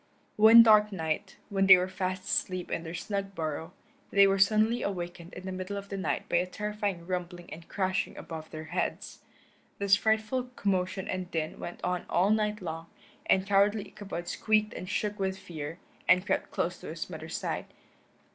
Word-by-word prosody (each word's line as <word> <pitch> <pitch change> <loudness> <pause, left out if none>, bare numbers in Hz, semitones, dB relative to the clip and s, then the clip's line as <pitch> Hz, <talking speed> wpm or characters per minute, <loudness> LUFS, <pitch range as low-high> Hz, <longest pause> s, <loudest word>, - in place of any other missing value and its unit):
One 225 +2 +10
dark 215 -1 +6
night, 160 -5 -3
when 195 -2 +2
they 185 -1 +11
were 180 +1 0
fast 185 0 -3
asleep 185 -2 -2
in - - -1
their 165 +1 -6
snug 200 +1 -4
burrow, 160 +1 -3 0.4
they 200 0 +6
were 195 0 +2
suddenly 215 +4 +3
awakened 175 -3 -4
in 185 - -8
the 190 - -4
middle 185 +2 -4
of 200 0 -7
the 200 - -4
night 190 - -2
by - - +2
a 180 - +1
terrific 210 0 -3
rumbling 175 -1 -5
and 165 +2 -11
crashing 185 -2 -1
above 160 -1 -7
their 155 0 -7
heads. - - -2 0.6
This 200 -1 +4
frightful 220 +4 +1
commotion 190 -1 -1
and 185 -1 -3
din 155 -2 -3
went 175 - -7
on 180 0 -1
all 190 +4 +3
night 210 -2 0
long, 165 -1 -5 0.4
and 190 0 +3
cowardly 200 +1 +2
Ichabod 190 -4 -7
squeaked 215 +1 +1
and 185 - -7
shook 210 0 -2
with 190 -1 -1
fear, 160 -3 -7 0.3
and 180 +1 +5
crept - - 0
close - - -2
to - - -9
his - - -5
mother's - - -6
side. - - -3
190 Hz, 185 wpm, -29 LUFS, 175-205 Hz, 0.6 s, they